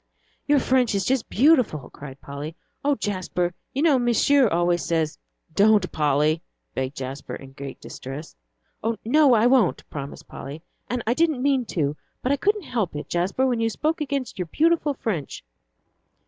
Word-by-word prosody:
"Your 290 Hz, -1 st, +5 dB
French 255 Hz, -4 st, +2 dB
is 195 Hz, -2 st, 0 dB
just 260 Hz, -2 st, 0 dB
beautiful," 250 Hz, -, +3 dB
cried 140 Hz, -2 st, -10 dB
Polly. 145 Hz, +3 st, -7 dB, 0.3 s
"Oh, 285 Hz, 0 st, +3 dB
Jasper, 185 Hz, -5 st, -2 dB, 0.2 s
you 275 Hz, +3 st, -1 dB
know 295 Hz, -6 st, +5 dB
Monsieur 245 Hz, +3 st, +4 dB
always 175 Hz, -2 st, +1 dB
says 160 Hz, 0 st, -1 dB, 0.2 s
" 160 Hz, -, -36 dB
"Don't, 210 Hz, -3 st, +4 dB
Polly," 150 Hz, +1 st, +2 dB, 0.3 s
begged 130 Hz, +1 st, -3 dB
Jasper, 135 Hz, +1 st, -5 dB
in 135 Hz, -1 st, -11 dB
great 135 Hz, 0 st, -8 dB
distress. 135 Hz, +4 st, -8 dB, 0.7 s
"No, 275 Hz, +1 st, +5 dB
I 220 Hz, +1 st, +4 dB
won't," 245 Hz, -7 st, +3 dB
promised 140 Hz, -1 st, -7 dB
Polly, 145 Hz, +4 st, -8 dB, 0.3 s
"and 245 Hz, -1 st, -2 dB
I 230 Hz, -, +2 dB
didn't 310 Hz, -3 st, +1 dB
mean 270 Hz, -3 st, +2 dB
to. 145 Hz, -2 st, +1 dB, 0.3 s
But 255 Hz, -, +1 dB
I -, -, +4 dB
couldn't 415 Hz, +6 st, +1 dB
help 220 Hz, -, -2 dB
it, 150 Hz, -, -6 dB
Jasper, 185 Hz, +9 st, +1 dB
when 245 Hz, -3 st, +1 dB
you 225 Hz, 0 st, +2 dB
spoke 310 Hz, -, -1 dB
against 280 Hz, -7 st, -3 dB
your 180 Hz, -, -2 dB
beautiful 310 Hz, -, +2 dB
French." 180 Hz, -, -4 dB
215 Hz, 165 wpm, -24 LUFS, -, 0.7 s, Your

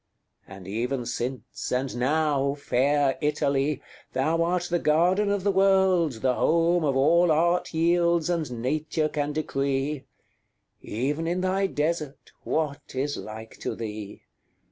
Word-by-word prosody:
And 95 Hz, -1 st, -11 dB
even 120 Hz, +5 st, -2 dB
since, 125 Hz, +2 st, -4 dB
and 130 Hz, +1 st, -1 dB
now, 140 Hz, +1 st, +1 dB
fair 140 Hz, 0 st, +1 dB
Italy! 140 Hz, -1 st, 0 dB, 0.3 s
Thou 155 Hz, +6 st, +1 dB
art 175 Hz, +1 st, +1 dB
the 175 Hz, 0 st, -1 dB
garden 180 Hz, +7 st, +3 dB
of 200 Hz, -2 st, 0 dB
the 200 Hz, -, +3 dB
world, 190 Hz, -, +3 dB
the 130 Hz, -1 st, +3 dB
home 170 Hz, +4 st, +2 dB
Of 140 Hz, -3 st, +1 dB
all 165 Hz, +5 st, +4 dB
Art 170 Hz, +3 st, +2 dB
yields, 170 Hz, 0 st, +2 dB
and 150 Hz, -10 st, -2 dB
Nature 155 Hz, +3 st, 0 dB
can 145 Hz, -1 st, -2 dB
decree; 140 Hz, -1 st, -2 dB, 0.8 s
Even 145 Hz, +8 st, -2 dB
in 175 Hz, +2 st, 0 dB
thy 190 Hz, +1 st, +1 dB
desert, 150 Hz, -3 st, -3 dB
what 150 Hz, -4 st, -3 dB
is 140 Hz, +2 st, -1 dB
like 110 Hz, +1 st, -9 dB
to -, -, -3 dB
thee? 105 Hz, -2 st, -7 dB
150 Hz, 135 wpm, -26 LUFS, 135-170 Hz, 0.8 s, all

